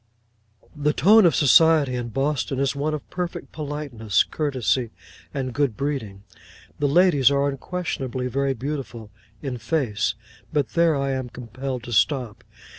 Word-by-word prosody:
The 150 0 +1
tone 210 +4 +6
of 165 - +2
society 150 -1 +5
in 120 -1 -3
Boston 135 +2 -1
is 140 0 0
one 150 +2 -1
of 150 - -8
perfect 180 -1 -5
politeness, 140 -8 -1
courtesy, 130 -5 -1 0.4
and 130 -3 -3
good 140 -5 0
breeding. 120 -9 -4 0.6
The 145 - +2
ladies 145 -3 +5
are 140 0 +1
unquestionably 135 -3 -3
very 135 +2 0
beautiful—in 115 -3 -7
face: 115 -5 -1 0.4
but 145 -3 0
there 170 -2 +3
I 140 0 -1
am 130 -2 -3
compelled 125 +1 -6
to 120 - -6
stop. 125 -2 +1
135 Hz, 135 wpm, -23 LUFS, 120-150 Hz, 0.6 s, tone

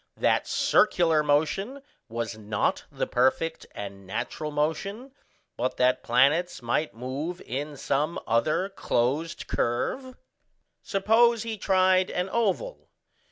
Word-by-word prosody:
that - - +2
circular 170 -7 +3
motion 160 - 0 0.3
was 115 0 -3
not 105 -1 -1
the - - -2
perfect 130 +6 0
and 100 -1 -8
natural 125 - -4
motion, 195 - -2 0.5
but 125 +2 -1
that 125 0 +3
planets 140 +9 +2
might 120 +5 -1
move 140 +9 -4
in 145 +4 -5
some 145 +5 -1
other 155 +11 +1
closed 150 -1 -1
curve? 255 - -2 0.7
Suppose 225 +3 +3
he 225 -1 -3
tried 185 -2 +3
an 180 +1 -2
oval. 235 - -1
155 Hz, 115 wpm, -27 LUFS, 125-195 Hz, 0.7 s, circular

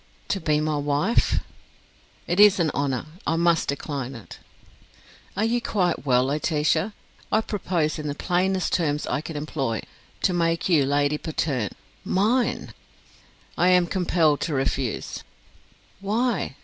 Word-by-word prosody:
"To 195 - 0
be 150 -2 +2
my 155 0 0
wife!" 145 +10 +1 0.8
"It 175 +3 -1
is 205 -2 +7
an 160 -3 +2
honour; 135 -3 -1 0.2
I 165 - +2
must 170 -1 +2
decline 140 -2 -3
it." 115 - -11 1.0
"Are 210 - +2
you 240 +1 +1
quite 180 -9 -1
well, 125 -1 +4
Laetitia? 155 +6 0 0.4
I 215 - +3
propose 175 -8 -1
in 150 - -4
the 145 - -3
plainest 185 +3 0
terms 150 -4 0
I 140 - -1
can 160 0 -7
employ, 135 -7 -2 0.4
to 185 - +3
make 165 -1 +1
you 155 -7 +3
Lady 145 +1 +1
Patterne 140 - -2 0.3
mine." 225 +7 +1 0.8
"I 180 - +3
am 180 -1 +5
compelled 170 -4 +1
to 155 - -1
refuse." 135 -2 -2 0.8
"Why? 215 - -1
160 Hz, 135 wpm, -24 LUFS, 145-185 Hz, 1.0 s, is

